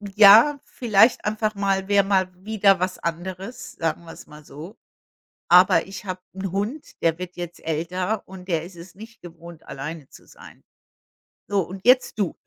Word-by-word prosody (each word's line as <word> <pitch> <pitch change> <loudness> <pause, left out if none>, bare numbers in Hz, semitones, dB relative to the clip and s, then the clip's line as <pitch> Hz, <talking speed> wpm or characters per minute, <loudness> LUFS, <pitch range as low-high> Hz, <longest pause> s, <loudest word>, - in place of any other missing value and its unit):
ja, 220 +8 +7
vielleicht 225 0 +2
einfach 215 0 -2
mal, 195 -1 -1
wäre 200 0 +3
mal 190 -2 +1 0.2
wieder 205 -3 +3
was 185 0 -3
anderes, 185 +6 -6
sagen 165 +1 -3
wir 165 - -11
es - - -13
mal 150 0 -14
so. 155 - -12 0.7
Aber 180 -1 +5
ich 195 +1 -9
habe 185 -1 -5
'n 190 -1 -5
Hund, 210 - -5
der 165 -1 +1
wird 180 0 -8
jetzt 175 0 -7
älter 180 +6 -3
und 185 -1 -12
der 165 -3 0
ist 180 +1 -13
es 170 +1 -13
nicht 225 +3 -14
gewohnt, 170 -1 -13
alleine 145 +1 -8
zu - - -17
sein. - - -16 0.9
So, 200 -1 +1
und 190 +2 -10
jetzt 250 -3 +3
du. 195 -5 -1
190 Hz, 175 wpm, -23 LUFS, 170-205 Hz, 0.9 s, ja